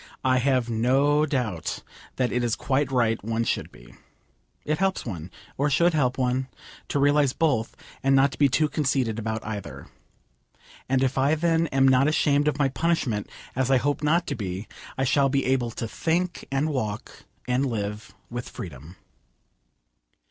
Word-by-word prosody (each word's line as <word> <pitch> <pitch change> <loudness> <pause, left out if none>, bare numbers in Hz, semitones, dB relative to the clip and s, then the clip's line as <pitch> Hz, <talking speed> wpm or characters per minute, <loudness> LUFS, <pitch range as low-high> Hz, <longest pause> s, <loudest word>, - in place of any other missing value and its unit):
I 130 -1 +3
have 130 -2 +1
no 135 +6 +2
doubt 120 - -2 0.3
that 125 -2 0
it 125 0 0
is 120 -2 +1
quite 135 0 0
right 115 -4 +1
one 115 +1 -1
should - - -2
be. - - -16 0.7
It 150 +2 -1
helps 195 0 0
one, 90 -7 -6 0.3
or 145 +1 +2
should 170 +5 +3
help 130 -5 +1
one, 130 0 0 0.4
to - - -1
realise 145 -1 +3
both, 135 -9 0 0.2
and 135 0 +3
not 135 0 +4
to - - -10
be 140 -2 +5
too 150 +4 +2
conceited 135 -6 0
about 110 0 -3
either. 100 -11 -6 1.0
And 135 0 +2
if 135 0 0
I 140 +4 +3
then 165 +1 +1
am 135 -2 +3
not 130 +1 +5
ashamed 145 -1 +2
of 150 -2 +1
my 145 -2 +3
punishment, 135 -9 -1 0.3
as 130 0 0
I 135 - +5
hope 145 +3 0
not 165 +3 +2
to 140 - -3
be, 95 -2 -5 0.3
I 135 - +1
shall 135 +1 +3
be 135 0 0
able 130 -2 +1
to 115 0 -5
think, 170 +8 -1
and 135 +3 +1
walk, 110 -7 -4 0.2
and 125 +2 +1
live 105 -1 -4 0.2
with 120 +1 -6
freedom. 80 0 -9
130 Hz, 170 wpm, -25 LUFS, 115-145 Hz, 1.0 s, be